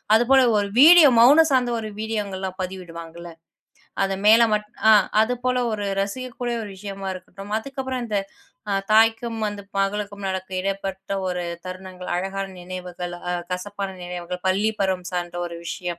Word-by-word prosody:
அது 225 - +5
போல 270 0 +7 0.2
ஒரு 200 -1 +1
வீடியோ, 325 0 +9
மவுன 290 +7 +8
சார்ந்த 255 -2 +2
ஒரு 220 - -5
வீடியோங்கெல்லாம் 200 -4 -3
பதிவிடுவாங்கல்ல. 170 -2 -8 0.7
அது 195 0 -1
மேல 225 +2 +8
மட்டும் 210 0 -2
அ - - +9 0.3
அது 250 +3 0
போல 250 0 +1
ஒரு 205 -1 -3 0.2
ரசிக்கக்கூடிய 240 +3 -3
ஒரு 205 - -8
விஷயமா 195 0 -6
இருக்கட்டும். 195 +3 -10
அதுக்கப்பறம், 260 0 -5
அந்த 210 -2 0 0.5
ஆ, - - +1 0.2
தாய்க்கும் 225 +1 +3
வந்து 205 -1 -5 0.2
மகளுக்கும் 200 0 -2
நடக்கும் 190 0 -4
இடப்பட்ட 195 0 -4
ஒரு 180 -1 -2 0.2
தருணங்கள், 185 0 -8
அழகான 195 +1 -3
நினைவுகள், 180 -1 -6 0.2
அ - - 0 0.2
கசப்பான 195 +2 -4
நினைவுகள், 180 0 -5
பள்ளி 205 +4 +2
பருவம் 185 -2 0
சார்ந்த 175 -1 -3
ஒரு 170 - -8
விஷயம். 175 -2 -4
195 Hz, 150 wpm, -23 LUFS, 185-220 Hz, 0.7 s, வீடியோ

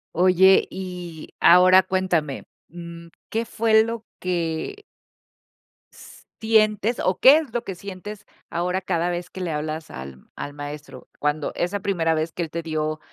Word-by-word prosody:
Oye, 185 +2 +5
y 180 -4 -7
ahora 185 +1 +7
cuéntame. 175 -7 -1 0.2
Mm, 170 0 -10 0.2
¿qué 230 +1 -1
fue 220 -1 +3
lo 230 0 -5
que? 175 - -3 1.1
¿s - - -15
sientes 220 0 +2
o 185 - 0
qué 275 +4 +8
es 300 -8 -4
lo 240 - -2
que 195 - -6
sientes 200 +2 -9 0.2
ahora 180 +2 -1
cada 175 -2 -1
vez 175 0 -4
que 190 - -8
le 175 -2 -2
hablas 155 +1 -4
al 65 0 -9
al 145 - -6
maestro? 145 -2 -9
Cuando 150 0 -1
esa 180 +4 -1
primera 170 -5 +1
vez 160 +1 -2
que 175 - -5
él 160 - -6
te 170 +1 -5
dio 155 -1 -2
180 Hz, 155 wpm, -23 LUFS, 160-200 Hz, 1.1 s, qué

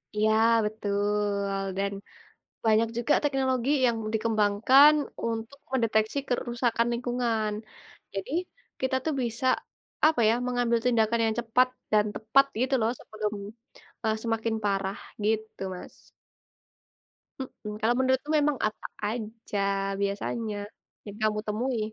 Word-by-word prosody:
Iya 215 +1 +3 0.3
betul 205 -1 -1 0.2
dan 200 0 0 0.7
banyak 225 +1 +4
juga 240 +5 +1
teknologi 265 -3 +1 0.2
yang 235 -2 +2 0.2
dikembangkan 220 +6 +5 0.3
untuk 230 +4 -3
mendeteksi 225 0 +1
kerusakan 240 -1 0
lingkungan. 235 -3 -1 0.6
Jadi 195 +5 -4 0.5
kita 260 0 +1
tuh 315 - 0
bisa, 235 +2 -2 0.6
apa 310 -6 +3
ya, 225 - +4
mengambil 245 -1 +1
tindakan 230 -1 +3
yang 220 -1 +1
cepat 250 +2 +3 0.2
dan 210 0 +4
tepat 230 +6 +4 0.2
gitu 265 +2 +1
loh 225 +1 +2
sebelum, 215 -1 -4 0.7
eee, 220 0 +2
semakin 225 -1 0
parah 195 -1 0 0.3
gitu 220 -1 -1
Mas. 180 - -10 1.5
Heeh. 245 -5 -7
Kalau 230 +2 +3
menurutku 260 +2 +1
memang 295 -1 +2
apa 215 - -7 0.2
aja, 220 -1 -4 0.4
biasanya, 205 +2 -2 0.5
yang 205 -1 -8
kamu 215 -1 +1
temui? 235 +3 -1
225 Hz, 115 wpm, -27 LUFS, 210-250 Hz, 1.5 s, dikembangkan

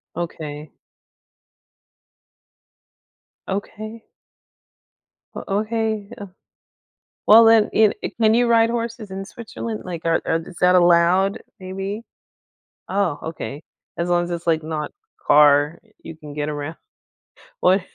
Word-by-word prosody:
Okay. 155 -3 -6 2.8
Okay. 215 +3 -6 1.3
Oh, - - -5 0.2
okay. 220 -2 -2
Uh 205 - -8 1.0
Well, 225 +1 +9
then, 225 -1 +5
e 215 -1 +5
i - - -3
can 220 0 +5
you 240 +1 +3
ride 230 0 +4
horses 230 -3 -4
in 195 +1 -5
Switzerland, 225 0 -7
like, 170 -2 -7
are 165 0 +2
are 165 - +1
is 165 +1 -10
that 180 0 +5
allowed, 175 +2 +4 0.2
maybe? 195 +3 -5 0.9
Oh, 185 -6 0
okay. 150 -2 -7 0.3
As 170 +1 -2
long 175 0 +2
as 175 - -7
it's 170 0 -5
like 160 -1 +2
not 155 -1 -4 0.3
car, 145 +1 +5 0.2
you 160 - -9
can 150 -2 -11
get 150 0 -3
around. 150 +2 -5 0.9
What? 190 +1 +4
185 Hz, 120 wpm, -21 LUFS, 160-215 Hz, 2.8 s, Well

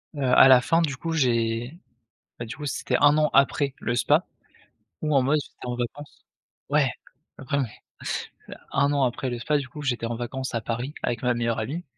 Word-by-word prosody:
Heu, 140 - -3
à 130 +1 +7
la 130 -2 +8
fin, 165 +6 +2
du 145 -5 -1
coup, 165 +4 -3
j'ai 120 -1 0 0.6
bah, 120 - -4
du 110 - -7
coup, 150 - -7
c'était 130 -2 -2
1 145 +1 +5
an 155 0 +3
après 140 0 +3
le 120 - -1
spa - - +3 0.8
où 150 -1 0
en 135 - +5
mode, 140 +4 +2
j'étais - - -13
en 125 0 -3
vacances 135 +4 -6 0.5
ouais 145 -3 +3 0.5
après, 135 +1 -3
ouais, 140 - +1 1.1
1 140 0 +2
an 140 -2 +2
après 130 +2 -2
le 120 - -3
spa, 150 +5 +1
du 140 -2 -6
coup, 150 - -9
j'étais 120 -4 -1
en 115 - -3
vacances 125 +2 -5
à 115 - 0
Paris 120 +6 -4
avec 120 - -2
ma 125 -1 +2
meilleure 115 -1 -1
amie 145 +11 -4
130 Hz, 205 wpm, -25 LUFS, 120-145 Hz, 1.1 s, la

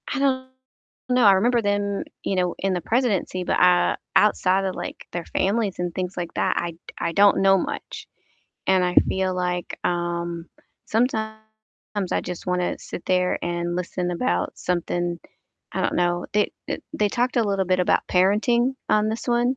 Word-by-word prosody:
I - - -1
don't 260 -2 +1 0.6
know, 250 -2 +4
I 200 - +8
remember 235 +5 +3
them, 205 -1 0 0.2
you 195 - -1
know, 180 -1 0
in 195 -1 0
the 180 - -1
presidency, 210 -4 0
but, - - 0
uh, 180 0 +4 0.2
outside 195 -2 +3
of, 190 - -2
like, - - -6
their 175 -1 -4
families 200 0 0
and 175 -1 -2
things 185 0 -3
like 175 -1 -4
that, - - +1
I 175 - -1
d 165 - -18 0.2
I - - -1
don't 200 +1 +5
know 195 0 +5
much. - - -5 0.6
And 190 -1 +4
I 180 0 0
feel 190 -1 0
like, 180 -1 -2
um, 170 -1 -2 0.4
sometimes 220 -3 -3
I - - +2
just 180 0 -6
wanna 180 -1 0
sit - - -8
there 180 0 +2
and 175 0 -2
listen 180 0 -2
about 90 - -1
something, 175 -1 -1 0.5
I - - -1
don't - - 0
know 175 0 +1
they, 210 0 +2 0.2
e - - -2 0.2
they 210 - +2
talked 245 +4 0
a 235 - +4
little 195 -2 0
bit 185 0 +2
about 180 - +2
parenting 230 +7 +3
on 215 0 +3
this 225 - -5
one, 240 +2 +2
190 Hz, 180 wpm, -24 LUFS, 175-215 Hz, 0.6 s, I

